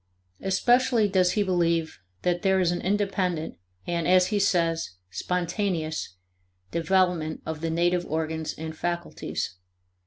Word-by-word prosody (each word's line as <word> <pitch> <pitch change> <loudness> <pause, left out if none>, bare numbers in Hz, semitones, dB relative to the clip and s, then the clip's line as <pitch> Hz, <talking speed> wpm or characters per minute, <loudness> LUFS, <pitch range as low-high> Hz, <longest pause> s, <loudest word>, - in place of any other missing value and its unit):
Especially 240 +3 +3
does 185 -2 +3
he 210 - +2
believe 170 -3 +1 0.2
that 175 -1 +1
there 190 -1 +3
is 175 -2 +3
an 175 - -2
independent 185 - -1 0.3
and, 170 -1 -1
as 180 0 +5
he 210 - +1
says, 165 - +1 0.2
"spontaneous" 170 - -2 0.6
development 170 -2 +1
of 160 -1 -4
the 165 - -1
native 175 +2 +1
organs 160 0 -2
and 160 0 -6
faculties. 175 - -3
175 Hz, 125 wpm, -26 LUFS, 160-190 Hz, 0.6 s, as